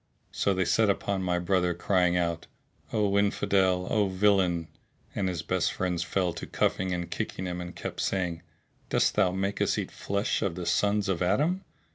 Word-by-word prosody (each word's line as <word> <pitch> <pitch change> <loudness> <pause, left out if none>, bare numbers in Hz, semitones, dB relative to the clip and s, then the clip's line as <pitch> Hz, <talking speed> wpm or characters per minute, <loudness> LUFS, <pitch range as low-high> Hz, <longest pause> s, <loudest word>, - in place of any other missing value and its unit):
So 100 - +1
they 95 0 +1
set 110 +3 +3
upon 100 0 0
my 90 -1 0
brother 90 0 +1
crying 90 0 +2
out, 85 -1 -1 0.4
"O 100 -2 +2
Infidel! 95 -2 +2
O 105 -2 +2
villain!"; 95 -3 +2 0.5
and 95 -2 -1
his 85 -3 -3
best 90 0 0
friends 90 -2 -1
fell 90 0 0
to 85 - -7
cuffing 95 0 0
and 85 -1 -3
kicking 95 - -3
him 90 -1 -3
and 90 0 -7
kept - - -5
saying, 90 -3 -1 0.5
"Dost - - +2
thou 90 - +3
make 100 +2 -2
us - - +2
eat - - -3
flesh 100 +3 -1
of 95 -4 -1
the 90 -1 -5
sons 100 +4 +1
of 95 -3 -1
Adam?" 150 - +1
95 Hz, 180 wpm, -28 LUFS, 90-100 Hz, 0.5 s, set